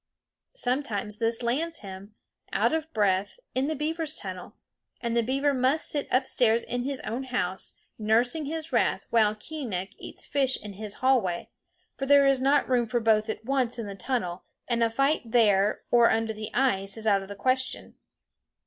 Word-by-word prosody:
Sometimes 230 - -1
this 230 +1 0
lands 315 +8 -1
him, 195 +1 -10 0.4
out - - +2
of 320 0 -2
breath, 200 - 0
in 260 +2 0
the 315 - -1
beaver's 310 +1 -2
tunnel; 185 -3 -7 0.4
and 235 -1 -2
the 235 - +4
beaver 275 +4 +1
must 260 +4 +2
sit 290 -2 0
upstairs 245 -3 +2
in 245 - -3
his 275 -1 -3
own 245 +4 -4
house, 190 -8 -3 0.3
nursing 240 +8 +2
his 320 +2 -5
wrath, - - +2
while 215 -2 +4
Keeonekh 215 - -5
eats - - -9
fish 270 -2 +1
in 210 -1 -8
his 210 +1 -6
hallway; 225 -10 +1 0.5
for 270 - -3
there 280 0 +6
is 275 -1 +3
not 275 +2 +3
room 245 -2 +2
for 240 +2 0
both 220 -1 +2
at 220 0 -5
once 255 -2 0
in 230 - -4
the 200 - -6
tunnel, 190 -3 -3 0.2
and 235 -1 +1
a 230 - +3
fight 275 +6 +1
there 215 -3 +3
or 235 -1 +6
under 225 0 0
the 215 0 -6
ice 195 -6 0
is 220 - -6
out 200 -2 +3
of 195 - -9
the 200 - -7
question. 260 +5 -1
235 Hz, 180 wpm, -27 LUFS, 210-270 Hz, 0.5 s, there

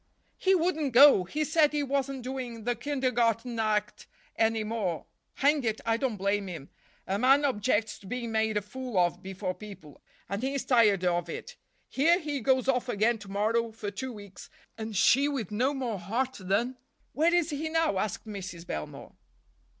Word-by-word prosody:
"He 385 0 +4
wouldn't 320 -6 0
go—he 275 - +6
said 305 0 +3
he 295 -1 0
wasn't 275 -1 -2
doing 250 -3 -5
the 245 +2 +1
kindergarten 240 -3 0
act 210 -1 -1 0.3
any 225 -1 +1
more. 210 -7 -3 0.3
Hang 285 0 +2
it, 220 -2 -1
I 225 0 +2
don't 235 -3 -2
blame 200 +1 0
him. 165 -6 -8 0.4
A 195 +2 -1
man 270 +4 +5
objects 220 -3 0
to 195 - -14
being 240 +1 -4
made 220 -1 +1
a 210 - -1
fool 250 +1 -6
of 175 0 +2
before 190 0 -4
people, 195 -8 -12 0.3
and 200 +3 -3
he's 270 +1 -2
tired 210 -7 +4
of 175 -1 0
it. - - -7 0.3
Here 325 +6 +3
he 295 -4 -3
goes 260 +1 +2
off 250 -2 +1
again 225 +1 +1
to 205 -2 -11
morrow 225 +3 0
for 215 -2 -6
two 260 +5 -5
weeks, 205 -5 -11 0.3
and 220 -2 -5
she 275 +8 +5
with 265 -10 -3
no 250 +6 +1
more 250 -7 -3
heart 245 +9 -2
than—" 215 +7 0 0.4
"Where 320 +4 +3
is 340 -2 +1
he 305 +2 -3
now?" 325 -11 +1
asked 210 +2 -3
Mrs. 190 -5 -7
Belmore. 75 - -6
230 Hz, 175 wpm, -28 LUFS, 205-270 Hz, 0.4 s, go—he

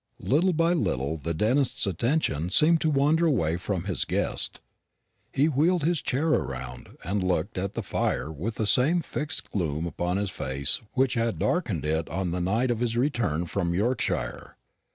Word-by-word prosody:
Little 175 +7 +3
by 165 +2 +2
little 75 - -1
the 80 +2 -4
dentist's 125 - +1
attention 95 - 0
seemed 160 - +5
to 160 - +2
wander 150 +4 +3
away 85 - +1
from 90 -1 -3
his 95 -3 -1
guest. - - -1 0.7
He 140 - +2
wheeled 160 +3 +2
his 165 -1 +1
chair 145 +6 0
round, 65 - -3
and 100 +3 -1
sat 90 - -1
looking 90 +2 -1
at 100 - -3
the - - -3
fire 75 - -1
with 95 +9 -4
the 110 - -1
same 155 +11 +3
fixed 150 0 -3
gloom 80 -4 -1
upon 90 +2 -2
his 100 -1 -1
face 70 - -1
which 130 0 +2
had 115 -6 0
darkened 105 - -1
it 80 +1 -1
on 95 0 -2
the 90 +1 -2
night 115 +8 +1
of 115 - -1
his 120 -1 -1
return 120 - 0
from 85 0 -1
Yorkshire. 115 +5 -2
105 Hz, 175 wpm, -26 LUFS, 85-140 Hz, 0.7 s, seemed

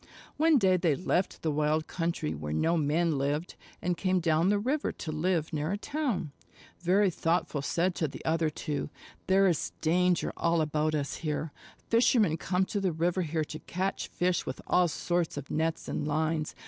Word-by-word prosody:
One 315 0 +5
day 190 -5 +4
they 165 -5 +2
left 180 +3 -1
the 160 - +1
wild 155 +1 +1
country 165 - -2
where 75 0 -5
no 165 - +2
men 155 0 +1
lived, 145 +5 -1 0.3
and 180 0 +1
came 185 +1 +1
down 165 +1 +2
the 205 - +3
river 265 +8 0
to 160 - -6
live 160 0 0
near 155 +2 -1
a 200 - -1
town. 250 - -2 0.5
Very 185 +3 +3
Thoughtful 165 -3 0
said 175 +6 0
to 160 - -1
the - - -10
other 160 0 +2
two: 150 -1 -4 0.4
"There 195 +1 +5
is 175 -5 +1
danger 180 +2 +2
all 170 0 +1
about 155 0 0
us 140 -2 -2
here. 155 0 -3 0.4
Fishermen 230 -7 +4
come 180 +3 0
to 205 - -2
the 190 -2 +1
river 170 +3 0
here 160 -1 -1
to 155 +1 -7
catch 190 +2 -3
fish 180 -1 0
with - - -5
all 180 -1 +3
sorts 175 0 -1
of 145 -1 -6
nets 160 +1 -1
and 145 - -2
lines. 155 +1 -1
165 Hz, 185 wpm, -29 LUFS, 155-185 Hz, 0.5 s, One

